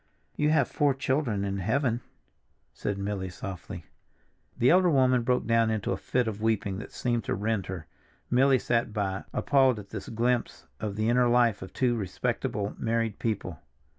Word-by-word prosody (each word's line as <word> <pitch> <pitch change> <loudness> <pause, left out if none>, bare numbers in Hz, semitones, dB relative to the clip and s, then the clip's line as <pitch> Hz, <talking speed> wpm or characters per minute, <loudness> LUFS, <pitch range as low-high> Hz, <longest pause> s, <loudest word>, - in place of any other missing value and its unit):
"You 150 - +2
have 155 - +3
four 145 -3 +1
children 130 -7 0
in 100 0 -2
heaven," 120 +4 0 0.7
said 100 - -3
Milly 100 -1 -3
softly. 90 +1 -7 0.7
The 125 - +4
elder 180 0 +5
woman 130 -4 +4
broke 125 +1 +1
down 115 0 +3
into 110 -2 -1
a 95 - 0
fit 125 +4 0
of 105 -1 -4
weeping 105 -3 0
that - - -8
seemed 120 -2 -1
to - - -1
rend 105 -2 -1
her. 90 -4 -6 0.4
Milly 130 +2 +4
sat 115 -3 0
by, 95 -2 -2
appalled 135 -4 +3
at 100 -1 -9
this - - -7
glimpse 120 +2 -1
of 105 -2 -3
the 110 +1 0
inner 125 +1 +4
life 120 -3 +3
of 95 - -8
two 125 -2 +1
respectable 100 0 -2
married 115 -2 -1
people. 95 -8 -3
115 Hz, 170 wpm, -28 LUFS, 100-125 Hz, 0.7 s, elder